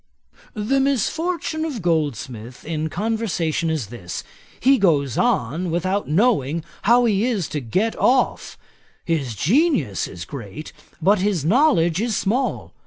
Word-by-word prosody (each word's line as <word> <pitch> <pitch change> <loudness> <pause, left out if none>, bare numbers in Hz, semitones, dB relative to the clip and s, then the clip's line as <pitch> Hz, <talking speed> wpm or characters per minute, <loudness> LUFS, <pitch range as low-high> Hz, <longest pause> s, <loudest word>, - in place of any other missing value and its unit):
'The 225 +6 +1
misfortune 315 - 0
of 300 -7 -3
Goldsmith 130 -8 -2
in 160 -1 -2
conversation 180 -5 -1
is 150 -10 -2
this: 90 -7 -6 0.4
he 265 +1 +4
goes 145 - +2
on 165 +10 0
without 185 +4 -1
knowing 165 - +2 0.2
how 240 +3 +4
he 210 -2 +2
is 210 -9 -1
to 150 - -2
get 185 - -1
off. 255 0 +1 0.5
His 140 -9 -1
genius 175 - +1
is 90 -3 -8
great, 135 - -8 0.3
but 200 +3 +4
his 190 -6 0
knowledge 180 - +3
is 225 -3 0
small. 245 +7 -1
180 Hz, 130 wpm, -22 LUFS, 150-235 Hz, 0.5 s, he